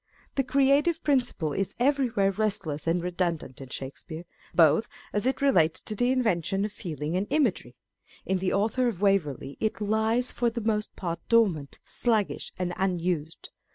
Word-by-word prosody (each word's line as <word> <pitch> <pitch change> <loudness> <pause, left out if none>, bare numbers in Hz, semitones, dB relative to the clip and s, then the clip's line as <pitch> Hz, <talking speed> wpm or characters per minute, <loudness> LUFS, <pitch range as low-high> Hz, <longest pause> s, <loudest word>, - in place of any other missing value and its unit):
The 270 - +1
creative 280 +5 +3
principle 245 - +1
is 195 -1 -2
everywhere 245 -7 +2
restless 190 -8 -1
and 170 +1 +1
redundant 170 -7 -2
in 135 - -9
Shakespeare, 155 +6 -7 0.3
both 165 +6 +4 0.2
as 210 +4 0
it 265 +1 0
relates 170 - +3
to 215 - -6
the 245 +4 +2
invention 195 -6 +1
of 210 - -4
feeling 160 -5 -4
and 195 +3 0
imagery; 240 - 0 0.5
in 190 0 0
the 185 0 0
Author 225 +5 +1
of 210 -5 -3
Waverley 150 -9 +1
it 220 - -1
lies 220 +4 +1
for 240 -1 +1
the 235 +1 -4
most 215 -1 -1
part 170 -2 -3
dormant, 190 -12 +2 0.3
bluggish, 220 -4 +1
and 180 -1 -2
unused. 175 -4 -2
195 Hz, 155 wpm, -27 LUFS, 170-235 Hz, 0.5 s, both